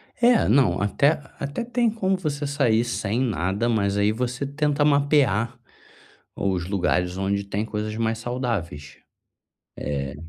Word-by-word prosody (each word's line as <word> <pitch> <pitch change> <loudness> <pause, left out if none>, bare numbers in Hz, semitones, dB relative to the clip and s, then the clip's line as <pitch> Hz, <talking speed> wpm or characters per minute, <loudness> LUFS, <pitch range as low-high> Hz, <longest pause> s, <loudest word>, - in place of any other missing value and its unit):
É, 240 0 +4
não, 110 -7 +3
até 140 - +2 0.2
até 140 +11 -3
tem 240 0 +1
como 195 -3 0
você 145 -5 -3
sair 125 -6 +2
sem 115 -2 -2
nada, 105 -2 0
mas 100 -3 +1
aí 105 +1 +3
você 125 +4 -2
tenta 145 +1 0
mapear 140 -6 +2 0.8
os 95 -3 -1
lugares 90 -2 0
onde 100 +1 -1
tem 100 +2 -2
coisas 105 -1 -4
mais 115 0 -1
saudáveis. 115 - -4 0.8
Eh 70 -2 -3
115 Hz, 135 wpm, -24 LUFS, 100-140 Hz, 0.8 s, É